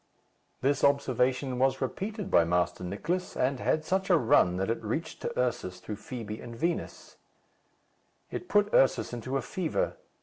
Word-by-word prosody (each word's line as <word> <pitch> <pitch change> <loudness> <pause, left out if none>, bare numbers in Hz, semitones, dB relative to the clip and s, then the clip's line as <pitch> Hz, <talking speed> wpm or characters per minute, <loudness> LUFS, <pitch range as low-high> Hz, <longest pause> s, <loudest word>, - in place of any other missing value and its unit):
This 135 +1 +1
observation 130 -2 +2
was 135 0 +2
repeated 200 - -3
by 85 - +6
Master 90 +1 0
Nicless, 150 - -3
and 130 +1 +1
had 155 +4 0
such 190 +2 0
a 175 - +6
run 105 - +4
that 95 +4 0
it 115 - -3
reached 155 +9 -3
to - - -3
Ursus 120 -7 -1
through 105 +2 -6
Fibi 110 -1 -6
and 120 -1 -8
Vinos. 170 +6 -3 1.1
It - - -5
put 205 0 +3
Ursus 135 -2 +3
into 130 +3 -2
a 135 - -3
fever. 165 +5 -2
130 Hz, 160 wpm, -29 LUFS, 110-160 Hz, 1.1 s, by